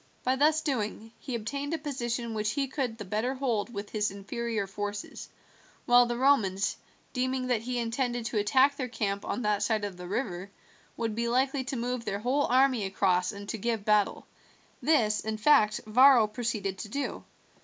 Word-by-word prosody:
By 255 +1 +2
thus 305 +3 +3
doing 225 -6 -3
he 255 - -5
obtained 280 +7 -3
a - - -2
position 240 -5 -3
which 210 -1 -1
he 275 -1 0
could 255 -4 -3
the 210 - -7
better 220 +7 -1
hold 240 -5 -1
with 205 -2 -6
his 210 -1 0
inferior 210 +2 -3
forces, 205 +1 -6 0.6
while 245 0 +6
the 240 0 -2
Romans, 215 -7 +2 0.4
deeming 255 0 -1
that 245 -4 0
he 250 +2 -3
intended 240 0 -1
to 215 -1 -1
attack 265 +7 +4
their 255 - -2
camp 200 -4 -2
on 250 - -3
that 210 -1 +1
side 210 0 +1
of 195 -3 -6
the 180 0 -8
river, 195 -3 -3 0.5
would 225 -2 -2
be 235 +2 -1
likely 260 +3 +1
to 265 - -3
move 245 0 -2
their 200 - -2
whole 255 +7 +1
army 255 -3 +3
across 185 -2 +1
and 200 -1 -9
to 225 - -3
give 225 -1 -2
battle. 210 -1 +2 0.6
This 225 -9 +3
in 220 0 -3
fact 215 -3 +4
Varro 250 +1 +6
proceeded 210 -3 -3
to 215 - -6
do. 280 +6 -3
230 Hz, 185 wpm, -29 LUFS, 210-255 Hz, 0.6 s, while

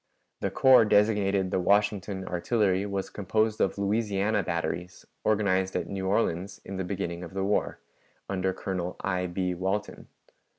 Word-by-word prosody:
The - - -1
corps 130 -3 +6
designated 100 -3 +2
the - - +1
Washington 100 0 +1
Artillery 95 +1 +1
was 100 -1 -3
composed 110 +2 0
of 95 - +1
Louisiana 105 0 +1
batteries, 85 +1 -4 0.2
organized 95 -3 +1
at - - 0
New 95 -1 -3
Orleans 95 -2 0
in 95 - -6
the 95 - -2
beginning 90 -2 -4
of 90 +2 -9
the 95 - -1
war, 100 +2 0 0.5
under 95 -1 0
Colonel 90 -2 -4
I. 90 -2 -1
B. 90 +1 -1
Walton. 95 +4 -3
95 Hz, 145 wpm, -28 LUFS, 90-105 Hz, 0.5 s, corps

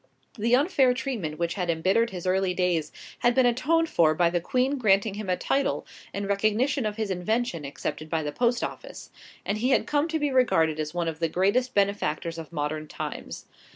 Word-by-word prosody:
The 235 0 +2
unfair 270 -3 +3
treatment 230 - -3
which 170 0 -1
had 180 -3 -3
embittered 190 +8 +2
his 180 -4 -7
earlier 185 0 +1
days 175 -4 0 0.3
had 240 0 +2
been 260 - +4
atoned 295 +8 +2
for 155 - +3
by 170 +1 +3
the 175 0 0
Queen 260 +8 0
granting 200 -2 +3
him 205 -1 -6
a 180 - +1
title 275 0 0 0.3
in 200 0 -4
recognition 215 +6 +1
of 210 - -4
his 215 -3 -2
invention 185 -2 -1
accepted 155 +2 -5
by 160 -1 -1
the 150 - -3
Post 240 +6 +1
Office, - - -7 0.3
and 210 +1 -1
he 250 +4 +1
had 265 - +3
come 295 +1 +1
to 325 -1 -1
be 295 -2 0
regarded 165 -12 +2
as 155 0 -2
one 170 -1 -1
of 160 -1 -4
the 165 -1 0
greatest 205 +10 +1
benefactors 195 -4 0
of 160 -1 -9
modern 155 0 -3
times. - - -6
200 Hz, 200 wpm, -26 LUFS, 170-250 Hz, 0.3 s, been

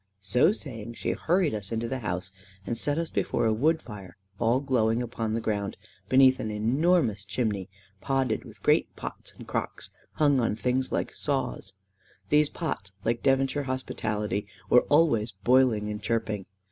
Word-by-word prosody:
So 125 - +4
saying, 115 - -6
she - - -2
hurried 175 -3 +1
us 105 -1 -4
into 115 +1 -1
the 130 +2 -3
house, 90 -4 -3 0.3
and 120 - -2
set 145 +5 -1
us 165 -1 -2
before - - 0
a 110 - +3
wood 155 +8 +2
fire 100 -5 -10 0.2
all 115 +3 +3
glowing 120 -5 +1
upon 115 -2 -2
the 115 - -1
ground, 100 -2 -2 0.3
beneath 130 0 +6
an 110 - -3
enormous 115 - +2
chimney 100 -1 -2 0.3
podded 135 -4 0
with - - -14
great - - +2
pots - - -7
and - - -11
crocks - - -4 0.2
hung 145 -3 +3
on 115 -3 +1
things 125 +3 0
like - - -1
saws. 95 +10 -3 0.5
These 150 0 +4
pots, 100 - -4
like 115 +1 0
Devonshire 135 +1 +2
hospitality, 105 -6 -2 0.2
were 125 - +6
always 145 -9 +3
boiling 115 +1 +3
and 105 - -5
chirping. 110 -4 -2
115 Hz, 160 wpm, -27 LUFS, 105-135 Hz, 0.5 s, beneath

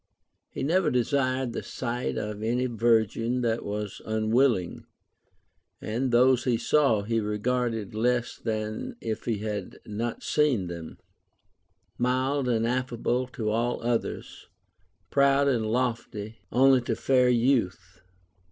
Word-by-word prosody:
He - - -5
never 165 +3 +2
desired 130 0 0
the - - -3
sight 125 0 -3
of 105 0 -4
any 120 +3 0
virgin 115 +1 +1
that 115 -1 0
was 105 0 -5
unwilling; 110 -2 +1 0.9
and 120 +5 -2
those 125 +1 +4
he 120 -3 +2
saw, 115 -2 +2
he 115 +2 0
regarded 110 0 -1
less 120 +2 0
than 110 - -3
if 110 -1 -4
he 115 -3 0
had 105 -1 -4
not 115 +3 -4
seen 145 -10 +2
them; 85 -2 -7 1.0
mild 130 +2 +1
and 115 -1 +1
affable 125 0 -1
to 110 -4 -3
all 120 +2 0
others, 120 -1 -3 0.6
proud 140 0 +4
and 120 -5 +1
lofty 115 -2 -2
only 130 0 +5
to 120 - -2
fair 125 -2 +3
youth. 110 -7 0
120 Hz, 125 wpm, -27 LUFS, 110-130 Hz, 1.0 s, only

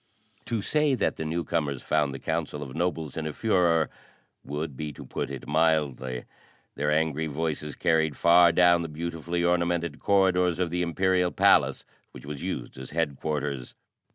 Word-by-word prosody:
To 115 -4 -2
say 150 0 +2
that - - 0
the 80 - -4
newcomers 80 -4 -2
found 75 -2 +1
the 65 - -6
council 80 -1 -3
of 65 -2 -9
nobles 80 -4 -2
in 80 -1 -3
a 75 - -4
furore 90 -6 +2 0.5
would 75 0 -4
be 75 +2 -4
to - - -10
put - - -4
it 70 -1 -7
mildly. 75 -5 0 0.5
Their 75 +1 -1
angry 80 0 +1
voices 75 -1 -3
carried 80 -3 +1
far 85 0 +6
down 85 0 +5
the 85 - -3
beautifully 85 +2 -3
ornamented 85 -2 0
corridors 90 -3 +3
of 90 -2 -1
the 90 0 -1
Imperial 90 +1 +1
Palace, - - +3 0.3
which - - -11
was 75 -1 -6
used - - -5
as 65 - -8
headquarters. 75 -4 -2
80 Hz, 160 wpm, -27 LUFS, 75-85 Hz, 0.5 s, far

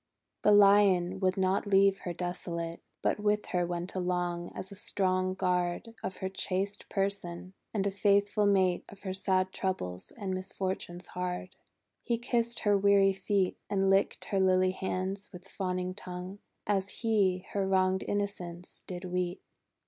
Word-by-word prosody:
The 210 - +5
Lion 195 -3 +5
would 185 0 +1
not 190 +2 +1
leave 195 0 +4
her 175 - -4
desolate, 170 -1 -4 0.2
But - - +1
with 210 0 +1
her 175 -1 +1
went 175 +1 -4
along, 180 -1 -1
as 190 - -6
a - - -8
strong 185 -1 0
guard 180 +4 0
Of 190 - -4
her - - +2
chaste 195 +1 -2
person, 195 -2 -2 0.2
and 200 -3 -1
a 200 - +1
faithful 200 +1 +3
mate 190 -3 +2
Qf 200 0 -14
her 190 -2 -3
sad 190 -1 +1
troubles 90 - -3
and 200 -5 -4
misfortunes 185 -1 -3
hard. 180 0 -4 0.5
He 235 -1 0
kissed 235 0 -1
her 205 -1 +3
weary 200 0 +5
feet, 195 -1 0
And 195 -1 +2
licked 195 +1 +2
her 195 - 0
lily 185 0 +4
hands 190 +1 -3
with 180 0 -11
fawning 185 -1 -2
tongue. 185 +1 -7 0.3
As 200 -1 +1
he 195 -5 +2
her 195 -1 0
wronged 190 0 +2
innocence 180 -4 -4
did 180 0 -6
weet. 180 0 -2
190 Hz, 155 wpm, -30 LUFS, 180-200 Hz, 0.5 s, The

